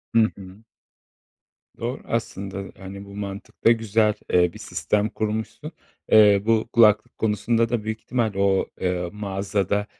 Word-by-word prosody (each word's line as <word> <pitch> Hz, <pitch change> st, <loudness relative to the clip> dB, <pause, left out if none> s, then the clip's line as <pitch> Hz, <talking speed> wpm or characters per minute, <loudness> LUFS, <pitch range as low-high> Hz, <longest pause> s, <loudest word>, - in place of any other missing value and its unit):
Hı 115 Hz, -1 st, +5 dB
hı. 95 Hz, +2 st, -12 dB, 1.2 s
Doğru 120 Hz, +3 st, -4 dB
aslında, 100 Hz, -4 st, -4 dB
e, 95 Hz, -, -9 dB
hani, 100 Hz, +1 st, -9 dB
bu 100 Hz, -, -12 dB
mantıkta 100 Hz, +3 st, -1 dB
güzel, 110 Hz, -1 st, +2 dB, 0.2 s
eee, 90 Hz, -1 st, +4 dB
bir -, -, -11 dB
sistem 105 Hz, +1 st, -1 dB
kurmuşsun. 110 Hz, +1 st, -4 dB, 0.4 s
Eee, 105 Hz, -2 st, +7 dB
bu 115 Hz, 0 st, +2 dB
kulaklık 110 Hz, 0 st, +4 dB
konusunda 115 Hz, +2 st, +1 dB
da 115 Hz, -3 st, -1 dB
büyük 110 Hz, 0 st, -4 dB
ihtimal 115 Hz, -5 st, -1 dB
o, 100 Hz, -1 st, +2 dB
eee, 90 Hz, -1 st, -1 dB
mağazada, 100 Hz, 0 st, -1 dB
105 Hz, 140 wpm, -23 LUFS, 100-110 Hz, 1.2 s, Eee